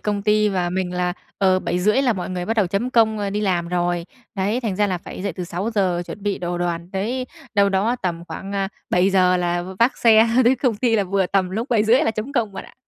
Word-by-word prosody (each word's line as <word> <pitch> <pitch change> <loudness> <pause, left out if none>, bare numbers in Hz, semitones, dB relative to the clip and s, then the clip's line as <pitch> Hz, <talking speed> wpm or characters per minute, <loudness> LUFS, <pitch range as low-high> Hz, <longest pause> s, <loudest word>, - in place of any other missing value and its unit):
công 205 -1 -2
ty 210 0 +3
và 180 -3 -1
mình 180 0 -2
là, 180 0 0 0.3
ờ, 190 -2 +3
7:30 200 +8 +1
là 250 -4 +3
mọi 185 -3 -5
người 180 -1 -3
bắt 225 - 0
đầu 210 - +3
chấm 200 +8 -2
công, 220 -3 +3
ơ, 200 -1 -2
đi 210 +1 -2
làm 175 -4 0
rồi. 175 -1 -1 0.3
Đấy, 205 +5 0
thành 215 -6 -2
ra 205 +1 +2
là 185 -3 -2
phải 180 - -9
dậy 200 -1 -2
từ 180 +2 -5
6:00 185 0 -1
chuẩn 205 - -8
bị 205 -1 -1
đồ 175 0 -3
đoàn, 175 0 -3
đấy, 240 +7 -2 0.3
đâu 200 -1 +4
đó 200 +5 +1
tầm 170 -2 -3
khoảng, 195 +1 -7
a, 195 -1 -1 0.2
7:00 185 0 +3
là 175 0 -1
v - - -8
vác 235 +3 +3
xe 225 -1 +5 0.2
tới 245 +3 +5
công 245 -6 0
ty 230 0 +2
là 205 - +1
vừa 195 0 0
tầm 185 -1 0
lúc 225 +8 -3
7:30 230 +2 +4
là 225 - +2
chấm 220 +5 -5
công 230 -7 0
bạn - - -7
ạ. - - -16
195 Hz, 250 wpm, -21 LUFS, 180-220 Hz, 0.3 s, xe